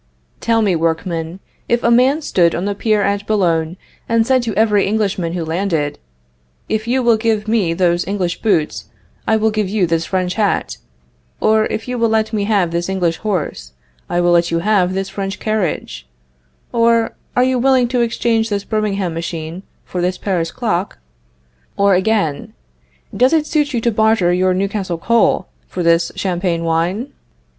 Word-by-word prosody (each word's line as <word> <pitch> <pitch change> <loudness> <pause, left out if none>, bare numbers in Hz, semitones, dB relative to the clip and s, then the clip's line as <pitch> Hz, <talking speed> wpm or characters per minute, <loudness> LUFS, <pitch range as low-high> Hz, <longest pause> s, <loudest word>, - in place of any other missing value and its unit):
Tell 230 -1 +1
me, 195 -4 +2
workmen, 165 +1 -2 0.3
if 240 0 +1
a 235 - +3
man 265 +6 +3
stood 170 - +2
on 175 - -2
the 205 - -1
pier 210 0 +1
at 200 +1 -1
Boulogne, 175 -5 +1 0.3
and 230 -1 +3
said 260 +1 +3
to 225 -4 -3
every 210 -2 +3
Englishman 195 -5 -1
who 175 -2 -3
landed: 165 -3 -1 0.7
If 220 +1 -2
you 255 +2 +1
will 235 -2 +4
give 220 -1 0
me 205 -7 +1
those 175 -1 +1
English 185 -3 -2
boots, 180 -9 0 0.4
I 220 - +3
will 220 0 +1
give 210 -3 -1
you 200 -2 +1
this 165 -1 0
French 185 -1 -1
hat; 205 -1 -1 0.6
or, 215 0 +3
if 220 - -4
you 250 -1 -3
will 230 0 +2
let 220 0 0
me 205 -2 0
have 200 -5 +1
this 170 +2 -2
English 180 -4 0
horse, 195 - -3 0.4
I 175 - +1
will 175 0 +3
let 170 0 +3
you 165 - 0
have 185 0 +1
this 195 0 -2
French 195 0 -4
carriage; 190 - -2 0.7
or, 230 -1 +2 0.2
Are 250 - +4
you 255 0 +1
willing 260 -1 +3
to 250 -1 +1
exchange 230 -1 0
this 200 -1 -2
Birmingham 200 -5 -1
machine 165 +1 -5 0.2
for 180 - -4
this 180 +1 0
Paris 175 -5 -1
clock? 210 -6 -2 0.8
or, 200 0 +4
again, 185 -6 0 0.6
Does 255 +5 +3
it 315 -2 +3
suit 295 -2 0
you 240 - 0
to 235 - +1
barter 220 -5 +2
your 185 0 +2
Newcastle 195 -2 -2
coal 230 0 +2 0.2
for 180 - -4
this 170 0 +3
Champagne 175 -2 -1
wine? 175 - -1
200 Hz, 175 wpm, -17 LUFS, 175-225 Hz, 0.8 s, will